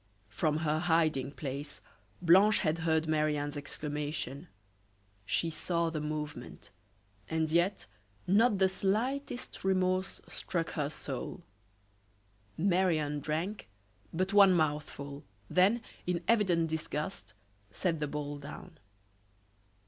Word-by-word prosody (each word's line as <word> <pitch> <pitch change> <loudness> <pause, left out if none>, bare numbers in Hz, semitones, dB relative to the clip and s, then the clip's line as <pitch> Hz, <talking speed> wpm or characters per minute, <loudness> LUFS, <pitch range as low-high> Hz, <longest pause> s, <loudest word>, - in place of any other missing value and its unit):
From 150 +7 0
her 155 +1 +2
hiding 160 -5 +2
place 140 0 -5 0.4
Blanche 190 +5 +6
had 160 -2 +1
heard 160 -1 +1
Marie 155 -1 +2
Anne's 145 0 -3
exclamation; 145 0 -4 0.8
she 165 +7 +1
saw 170 +1 -1
the 155 -2 -3
movement, 150 -8 -5 0.6
and 160 -1 0
yet 175 +4 +2 0.4
not 210 +3 +4
the 190 0 +5
slightest 240 +8 -2
remorse 185 0 +1
struck 170 -2 -3
her 145 -3 -1
soul. - - -5 1.1
Marie 185 -1 +3
Anne 150 -1 -2
drank 160 - -3 0.4
but 185 +4 -1
one 200 -2 +8
mouthful, 145 -2 -2 0.3
then, 200 +6 +4 0.2
in 175 -1 0
evident 190 -8 +3
disgust, 155 - -4 0.3
set 165 - -1
the 150 - -1
bowl 145 0 -4
down. 150 +3 -10
160 Hz, 110 wpm, -31 LUFS, 150-185 Hz, 1.1 s, one